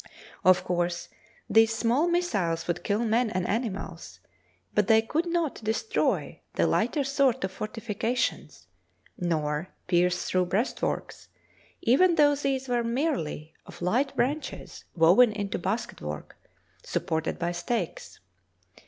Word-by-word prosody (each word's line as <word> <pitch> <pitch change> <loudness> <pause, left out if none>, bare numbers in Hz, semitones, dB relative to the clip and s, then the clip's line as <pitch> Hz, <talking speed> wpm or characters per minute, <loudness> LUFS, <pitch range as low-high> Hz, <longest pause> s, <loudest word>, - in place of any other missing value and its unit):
Of 185 0 +5
course, 175 -1 -1 0.4
these 225 0 +4
small 245 +8 +2
missiles 205 - 0
would 175 0 -2
kill 215 +3 0
men 230 +1 +2
and 185 -3 -2
animals, 190 - -4 0.5
but 210 - +2
they 220 -1 +5
could 320 +9 -1
not 335 -8 -1
destroy 225 - -1
the - - +3
lighter 290 - +1
sort 270 -2 +1
of 190 - -1
fortifications 225 +3 -3 0.5
nor 155 -1 -1 0.2
pierce 180 0 +2
through 185 -1 +1
breastworks, 210 +8 -2 0.6
even 335 +9 +4
though 290 -2 +5
these 275 -2 -1
were 240 -1 +1
merely 230 - -2
of - - -12
light 250 +10 +1
branches 290 +5 -3
woven 185 +8 +6
into 200 -3 -3
basket 225 +6 -3
work 75 0 -6 0.5
supported 160 -2 -2
by 175 0 -1
stakes. 240 - -4
220 Hz, 125 wpm, -27 LUFS, 175-265 Hz, 0.6 s, woven